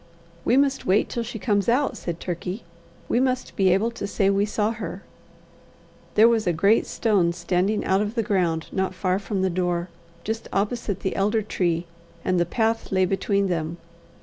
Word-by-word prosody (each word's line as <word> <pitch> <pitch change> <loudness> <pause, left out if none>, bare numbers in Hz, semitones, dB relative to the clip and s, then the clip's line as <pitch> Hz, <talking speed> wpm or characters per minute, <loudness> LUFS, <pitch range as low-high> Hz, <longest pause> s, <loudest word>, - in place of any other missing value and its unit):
"We 245 - +3
must 275 -1 +1
wait 195 +3 +3
till 235 - -2
she 230 0 -5
comes 205 -1 +1
out," 270 +4 +2
said 170 -1 -5
Turkey. 180 +4 -4 0.4
"We 240 - +2
must 255 0 -1
be 190 -1 +3
able 210 +6 +2
to 230 -3 -5
say 200 -1 +2
we 200 +1 +2
saw 210 +1 0
her." 230 0 -6 1.1
There 220 +2 +7
was 225 -3 +2
a 175 - +3
great 200 +7 +3
stone 195 -7 +2
standing 180 +4 0
out 190 +1 +2
of 210 +2 -2
the 230 - +1
ground 180 -6 0
not 190 0 -1
far 185 0 0
from 200 -1 -2
the 190 - +1
door, 175 0 -1 0.3
just 225 +1 -4
opposite 205 -1 -1
the 190 - -2
elder 210 +3 +1
tree, 175 -4 -1 0.4
and 185 -1 +2
the 175 - +1
path 225 +1 0
lay 185 -1 +3
between 200 +1 +1
them. 165 -2 -2
200 Hz, 185 wpm, -24 LUFS, 180-225 Hz, 1.1 s, There